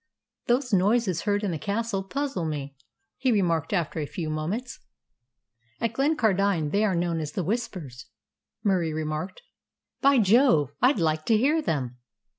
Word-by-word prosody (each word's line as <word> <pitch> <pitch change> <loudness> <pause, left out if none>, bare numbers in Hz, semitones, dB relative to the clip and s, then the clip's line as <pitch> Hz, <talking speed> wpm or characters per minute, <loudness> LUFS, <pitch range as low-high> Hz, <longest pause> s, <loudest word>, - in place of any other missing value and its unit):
"Those 245 0 +1
noises 195 -2 +2
heard 205 +1 +1
in 200 - 0
the 160 - -3
castle 205 +3 -2
puzzle 270 -1 -3
me," 140 -3 -4 0.4
he 260 -1 +2
remarked 170 -7 +1
after 170 -5 -1
a 150 - -3
few 160 -1 -4
moments. 195 +11 -4 1.0
"At 230 -1 -1
Glencardine 200 - +1
they 205 +4 +2
are 200 -4 +1
known 170 -1 0
as 150 -2 -5
the 185 - -2
Whispers," 170 - -4 0.6
Murie 180 -6 +1
remarked. 155 +4 -4 0.6
"By 275 0 +5
Jove! 210 - +4
I'd 255 +1 +4
like 155 -3 0
to 225 - +4
hear 295 +8 +2
them." 130 - -2
190 Hz, 150 wpm, -26 LUFS, 155-230 Hz, 1.0 s, By